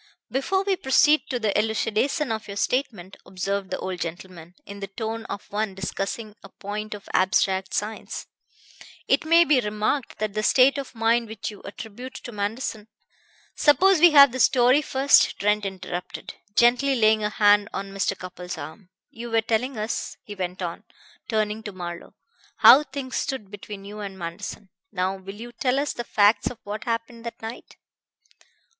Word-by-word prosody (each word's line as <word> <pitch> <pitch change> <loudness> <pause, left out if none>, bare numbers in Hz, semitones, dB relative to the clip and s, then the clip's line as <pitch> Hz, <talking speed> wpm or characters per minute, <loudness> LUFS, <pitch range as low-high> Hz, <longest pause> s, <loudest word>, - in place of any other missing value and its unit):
"Before 355 - 0
we 395 -1 +1
proceed 300 -1 +3
to 255 - -1
the 215 -3 0
elucidation 225 +6 0
of 220 -1 -4
your 200 0 -7
statement," 205 -6 -2
observed 195 +1 -3
the - - -2
old 185 -1 -5
gentleman, 175 0 -7
in 200 0 -9
the 195 - -5
tone 225 +3 -5
of 200 - -6
one 210 -1 -2
discussing 195 +3 -4
a 195 - -13
point 210 +2 -6
of 205 - -13
abstract 190 0 +2
science, 215 +1 -4 0.8
"it - - +2
may 335 +2 +6
be 295 -5 +4
remarked 215 +5 -2
that 215 -1 -2
the 215 - -1
state 265 +5 +4
of 270 -2 -8
mind 230 +1 +2
which 215 -1 -5
you 205 - -13
attribute 230 +5 -9
to 240 - -8
Manderson 210 +1 -4 0.4
" - - -35 0.3
"Suppose 370 +5 +5
we 345 +2 +8
have 280 -4 +8
the 260 - -5
story 255 +2 +5
first," 275 -1 +4
Trent 210 0 +1
interrupted, 180 -2 -6 0.2
gently 250 +3 +4
laying 220 -2 +3
a 210 - +1
hand 205 -1 +4
on 195 0 -5
Mr. 195 0 -1
Cupples' 180 -1 -7
arm. 185 +3 -9 0.2
"You 235 +1 -8
were 225 0 +2
telling 230 +3 -1
us," 215 +2 -3
he 210 - -8
went 185 -1 -4
on, 170 -1 -5 0.5
turning 215 -1 0
to 210 - -7
Marlowe, 175 -2 -8 0.4
"how 275 - +9
things 265 -2 -5
stood 215 -8 -3
between 205 -1 -9
you 210 +1 -8
and 195 -2 -6
Manderson. 185 +3 -7 0.2
Now 190 -1 -1
will 195 +1 -9
you 235 +3 -9
tell 250 +2 0
us 285 +1 0
the 240 - -5
facts 205 -1 +3
of 250 - -10
what 210 +2 -6
happened 230 0 -3
that 235 - -7
night?" 225 +2 -9
215 Hz, 175 wpm, -24 LUFS, 195-245 Hz, 0.8 s, how